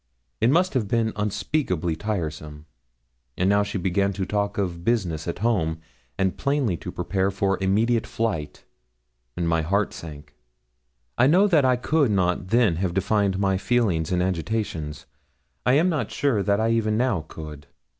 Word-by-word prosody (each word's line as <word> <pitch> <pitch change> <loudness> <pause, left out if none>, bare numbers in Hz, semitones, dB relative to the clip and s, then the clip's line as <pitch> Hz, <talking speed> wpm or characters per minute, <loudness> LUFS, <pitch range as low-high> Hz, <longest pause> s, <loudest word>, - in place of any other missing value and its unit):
It 115 - +3
must 180 +6 +3
have 120 -6 0
been 110 0 0
unspeakably 105 - -1
tiresome. 75 -6 -4 0.7
And 90 - +1
now 100 +1 +4
she 100 0 -3
began 100 +2 0
to 95 0 -3
talk 100 0 -1
of 90 -4 -2
business 90 -8 -1
at 85 - -3
home, 80 -9 +1 0.4
and 95 -1 0
plainly 140 -9 +1
to 90 - -7
prepare 95 +2 -1
for 95 -1 0
immediate 110 +5 +2
flight, 100 -10 -3 0.7
and 85 -1 -1
my 80 -1 +2
heart 100 +6 0
sank. 75 -3 -10 0.9
I 125 - +6
know 180 +7 +5
that 160 -9 +4
I 130 -1 +4
could 145 +2 +1
not 90 -2 0
then 110 -5 +3
have 90 -1 -2
defined 100 0 +1
my 95 -1 +1
feelings 95 -9 +1
and 90 0 +2
agitations. 90 -4 -3 0.6
I 125 - +5
am 155 +6 +4
not 150 - -1
sure 135 -8 +1
that 100 +2 +1
I 110 +1 +2
even 110 -2 +1
now 115 - 0
could. 75 -3 -9
100 Hz, 165 wpm, -24 LUFS, 90-115 Hz, 0.9 s, I